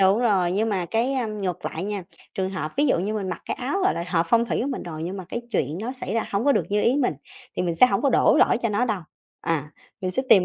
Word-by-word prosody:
Đúng 195 +2 +5
rồi, 195 -7 +2
nhưng 215 +4 +1
mà 190 -5 -1
cái, 230 +7 +1
a, 255 -4 0
ngược 200 -5 -4
lại 165 - -3
nha, 205 -1 -3 0.3
trường 190 -1 -1
hợp 155 -5 -4
ví 290 +2 +3
dụ 260 - +3
như 205 +5 -1
mình 195 -3 -2
mặc 175 - -5
cái - - -1
áo, 280 +11 -1
gọi 385 - +3
là, 170 - -3
hợp 170 -2 +1
phong 235 0 +4
thủy - - -1
của - - -1
mình 265 - -3
rồi 160 -2 -6
nhưng 180 +4 -4
mà 190 - -6
cái 235 - -3
chuyện 150 - -1
nó 240 +4 -3
xảy 255 -6 -5
ra 230 - +1
hổng 200 +3 0
có 285 - +5
được - - +1
như 210 0 +2
ý 250 - +3
mình, 255 - +1 0.4
thì - - +1
mình 175 -2 0
sẽ 255 - +7
hổng 200 -5 0
có 280 - +3
đổ - - +5
lỗi - - +5
cho 230 - +2
nó 210 +3 +1
đâu, 215 -6 -1 0.4
à, 150 -2 -1 0.3
mình 185 - -1
sẽ 260 - 0
tìm 190 -3 +7
205 Hz, 305 wpm, -24 LUFS, 180-235 Hz, 0.4 s, sẽ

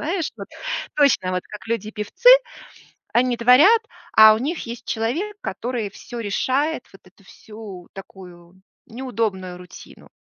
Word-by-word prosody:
Знаешь, 330 +1 -2
вот - - -9 0.5
точно, 280 -11 +3
вот 180 0 -2
как 210 -2 -10
люди 230 -2 -2
певцы, 210 - +3 0.8
они 245 0 +2
творят, 290 - +6 0.4
а 220 0 +9
у - - -4
них 305 +8 -3
есть 235 0 -8
человек, 295 - -2
который 240 -4 -4
всё 240 +4 -9
решает, 260 +8 -1
вот 195 - -16
эту 190 +2 -22
всю 210 -4 -12
такую 180 -2 -13 0.3
неудобную 220 -7 -4
рутину. 180 0 -14
225 Hz, 135 wpm, -21 LUFS, 195-260 Hz, 0.8 s, а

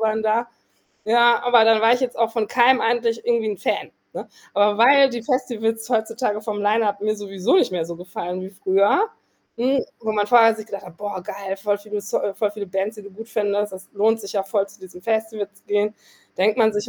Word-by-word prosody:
waren 220 0 0
da. 225 +2 0 0.6
Ja, 235 +2 +4
aber 245 -2 +5
dann 225 -1 +4
war 225 - +5
ich 250 - -3
jetzt 255 -2 -3
auch 230 -1 +2
von 225 -2 -1
keinem 255 +1 +4
eigentlich 230 0 0
irgendwie 235 -2 +1
'n 205 - -4
Fan, - - -2 0.2
ne? - - -7 0.3
Aber 205 0 +3
weil 275 +4 +7
die 240 -2 -5
Festivals 225 -3 -2
heutzutage 225 -1 -1
vom 210 -1 -4
Lineup 205 -1 +1
mir 215 +1 -1
sowieso 195 -2 -1
nicht 370 - +2
mehr 175 -3 -1
so 170 0 -7
gefallen 180 +1 -6
wie 190 - -7
früher, 200 - +2 0.5
hm, 260 +3 +1 0.2
wo 220 -1 -2
man 205 -1 0
vorher 225 0 +6
sich 215 -1 -9
gedacht 200 -2 -7
hat: 175 -2 -13
„Boah, 205 -2 -5
geil, 195 +1 -6
voll 205 +1 -1
viele 210 0 -5
so 200 - -2
äh, 200 - -3
voll 210 0 -1
viele 210 -1 -6
Bands, 195 +3 -3
die 210 - -10
du 200 - -12
gut 225 +4 -11
findest. 205 -2 -1
Das 185 0 -10
lohnt 220 +3 +2
sich 200 - -8
ja 200 - +1
voll, 195 0 0
zu - - -18
diesem 185 -1 -12
Festival 220 -2 -2
zu 200 - -25
gehen.“ 210 +1 0 0.4
Denkt 210 +5 +2
man 220 -1 +4
sich 210 0 -3
215 Hz, 225 wpm, -22 LUFS, 200-230 Hz, 0.6 s, weil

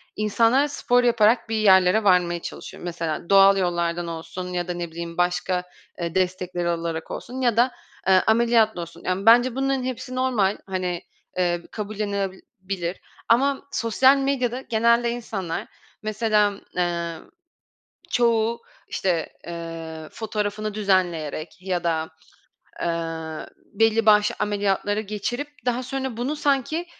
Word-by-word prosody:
insanlar 230 +6 +3
spor 245 -3 +1
yaparak 230 -1 +3
bir 225 - -1
yerlere 190 0 +5
varmaya 180 -3 +3
çalışıyor. - - -8
Mesela 170 -2 -4
doğal 195 0 +7
yollardan 175 -2 0
olsun 170 +2 -6
ya 175 0 -2
da 180 - -2
ne 175 -1 -5
bileyim 170 0 -7
başka, 180 +1 0 0.4
eee, 170 0 -3
destekleri 180 -1 -1
olarak 165 -1 -3
olsun 255 +2 -6
ya 240 -3 +2
da, 245 +2 +4 0.4
eee, 190 -1 +6
ameliyatla 220 -3 +3
olsun. 170 0 -9
Yani, 185 +2 -1
bence 240 +2 +6
bunların 270 -1 0
hepsi 255 0 -5
normal, 240 -6 +1
hani, 180 -2 -2 0.4
eee, 175 -1 +1
kabullenilebilir 200 -3 -4 0.3
ama 270 +4 +2
sosyal 260 +2 +4
medyada 265 -2 0
genelde 235 0 +2
insanlar, 200 -8 -4 0.4
mesela, 215 -1 +2 0.2
eee, 170 -1 -1 1.0
çoğu 230 - +2 0.3
işte, 175 -4 -1 0.2
eee, 165 -2 -7
fotoğrafını 215 -1 -3
düzenleyerek 175 -6 0
ya 180 -2 -2
da, 160 -2 0 0.7
eee, 165 -2 -3 0.3
belli 225 +1 +3
başlı 210 -1 +5
ameliyatları 205 0 0
geçirip 215 +7 -4 0.2
daha 245 +1 +1
sonra 265 -1 -4
bunu 260 +6 -2
sanki 290 +4 0
200 Hz, 125 wpm, -24 LUFS, 175-235 Hz, 1.0 s, doğal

